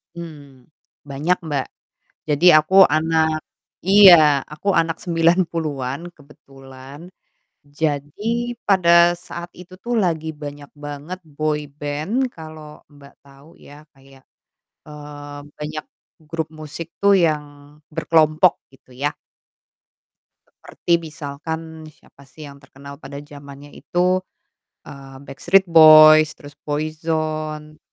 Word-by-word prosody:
Mmm, 145 -6 -11 0.4
banyak 150 +6 -1
Mbak 145 -4 -3 0.6
jadi 160 +4 +5
aku 190 +4 +6
anak 160 0 0 0.4
iya 175 -7 +7
aku 155 +7 -3
anak 165 -1 -1
90-an 165 -4 -1
kebetulan 140 +1 -15 0.5
jadi 160 +12 -3
pada 170 -2 +4
saat 175 -1 -9
itu 180 +1 -14
tuh 240 0 -2
lagi 165 -6 -1
banyak 145 0 -9
banget 145 +5 -8
boyband 150 - -3
kalo 155 -2 -12
Mbak 140 0 -17
tau 140 +4 -19
ya 145 +1 -16
kayak, 135 -1 -21 0.6
eee, 145 -1 -10 0.2
banyak 155 +1 -6 0.4
grup 160 -1 -4
musik 155 +1 -8 0.2
tuh 200 0 +5
yang 150 -3 -3
berkelompok 155 +2 +2 0.2
gitu 130 -1 -22
ya. 140 +3 -2 1.5
Seperti 170 - -3
misalkan 160 0 -8
siapa 140 -2 -20
sih 145 +3 -12
yang 140 - -14
terkenal 140 +1 -14
pada 140 -1 -10
zamannya 145 -1 -13
itu, 180 +1 0 0.7
eee, 135 -1 -12
Backstreet 175 +8 +1
Boys 155 -1 +8
terus 145 0 -15
Boyzone. 155 0 -4
155 Hz, 105 wpm, -20 LUFS, 145-165 Hz, 1.5 s, Boys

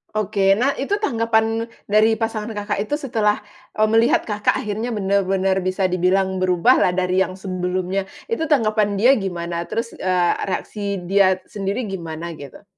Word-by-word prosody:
Oke. 200 -2 +2
Nah, 250 +7 +2
itu 280 +10 0
tanggapan 225 - +1 0.2
dari 215 +2 +3
pasangan 225 -1 -3
Kakak 205 -1 -2
itu 215 +8 -1
setelah, 225 -8 0 0.3
eee, 215 0 +3
melihat 225 +1 +4
Kakak 210 -1 0
akhirnya 215 +3 -3
benar-benar 195 -1 +1
bisa 185 +1 -2
dibilang 190 +1 +1
berubahlah 185 +1 +3
dari 185 0 +1
yang 185 -1 0
sebelumnya. 185 0 -2 0.2
Itu 325 -9 -1
tanggapan 215 -7 +2
dia 235 +7 +5
gimana? 170 -3 -4
Terus, 230 +1 -3
eee, 180 -2 +2
reaksi 200 +1 -3
dia 190 0 +2
sendiri 200 +4 -3
gimana, 170 -5 -5
gitu? 140 +6 -11
200 Hz, 145 wpm, -21 LUFS, 185-220 Hz, 0.3 s, dia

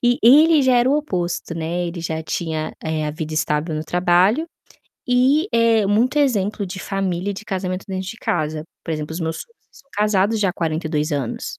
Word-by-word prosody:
E 245 0 +2
ele 300 +6 +7
já 260 -1 +4
era 240 +1 +3
o 285 - +3
oposto, 180 - -3
né, 170 +2 -2
ele 170 0 -6
já 160 -1 -3
tinha, 160 -1 -3
eh, 160 -1 -2
a - - -1
vida 155 0 -5
estável 150 +1 0
no 155 - -2
trabalho, 180 - +2 0.6
e, 260 +6 +3
eh, 230 -2 +3
muito 230 +8 +2
exemplo 210 -7 +1
de 190 +1 -7
família 195 -1 -2
e - - -1
de 215 +3 -9
casamento 185 -1 -3
dentro 190 -1 -4
de 225 - -7
casa. 155 -6 -2 0.2
Por 165 - -5
exemplo, 155 0 -3
os 165 - -5
meus 160 0 -2
sogros 465 -1 -23
são 275 - -20
casados 210 +1 +1
já 195 - +2
há - - -1
42 160 -2 -2
anos. 140 -5 -3
185 Hz, 200 wpm, -21 LUFS, 160-230 Hz, 0.6 s, ele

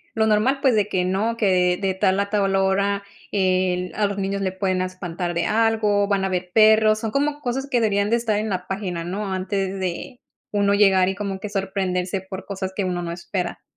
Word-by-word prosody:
lo 220 -1 +2
normal, 220 +6 +2
pues, 260 -4 +3
de 210 -1 +1
que 180 -3 0
no, 215 +5 0
que 180 -4 +2
de 190 -1 +1
tal 190 0 +1
a 200 0 -1
tal 195 -2 +1
hora, 200 +1 +1 0.3
eh, 185 -2 +1
a 210 - +1
los 200 0 -5
niños 195 0 -2
le 190 - 0
pueden 185 -1 -1
espantar 180 -1 -4
de 170 0 0
algo, 215 -2 +2
van 195 -1 +1
a - - +1
haber 180 -1 -3
perros, 215 +1 +5
son 220 -1 -3
como 290 +1 0
cosas 265 +1 -3
que 245 -3 +2
deberían 205 -2 +1
de 235 - +3
estar 220 -3 0
en 215 0 -2
la 185 -1 -3
página, 185 -4 -3
¿no? 195 +2 -3
Antes 190 0 -2
de 185 +7 -4 0.3
uno 200 -1 +2
llegar, 195 -2 +4
y 190 - -1
como 200 -1 -4
que 210 - -5
sorprenderse 190 -2 -2
por 190 0 -8
cosas 190 -1 -5
que 200 - -1
uno 180 -1 -2
no 170 -1 -4
espera. 180 +1 -4
195 Hz, 220 wpm, -22 LUFS, 185-210 Hz, 0.3 s, perros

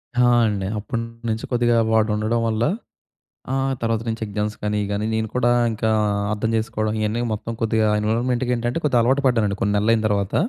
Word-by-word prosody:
ఆ! 125 0 +4 0.2
అండి. 100 -3 -2
అప్పటినుంచి 115 0 -4
కొద్దిగా 120 -1 +2 0.2
వాడు 110 0 +3
ఉండడం 110 +2 0
వల్ల, 110 0 0 0.9
ఆహ్, 135 0 0
తర్వాత 115 -1 0
నుంచి 115 0 -3
ఎగ్జామ్స్ 105 +1 -3
కానీ, 105 0 0
గానీ 100 +1 -1
నేను 110 0 -1
కూడా 125 -1 +2 0.2
ఇంకా 110 0 -1 0.4
అర్థం 110 +1 -1
చేసుకోవడం 110 -1 -1
ఇయన్నీ 110 +2 -1
మొత్తం 110 +2 -4
కొద్దిగా 110 -1 +2
ఎన్విరాన్మెంట్‌కేంటంటే 120 +3 0
కొద్దిగా 130 -5 +3
అలవాటు 130 +4 +2
పడ్డానండి 110 -6 +2
కొన్ని 100 +1 +1
నెలలు 105 +3 +3
అయిన 110 - 0
తర్వాత. 100 -2 -1
110 Hz, 165 wpm, -22 LUFS, 105-120 Hz, 0.9 s, ఆ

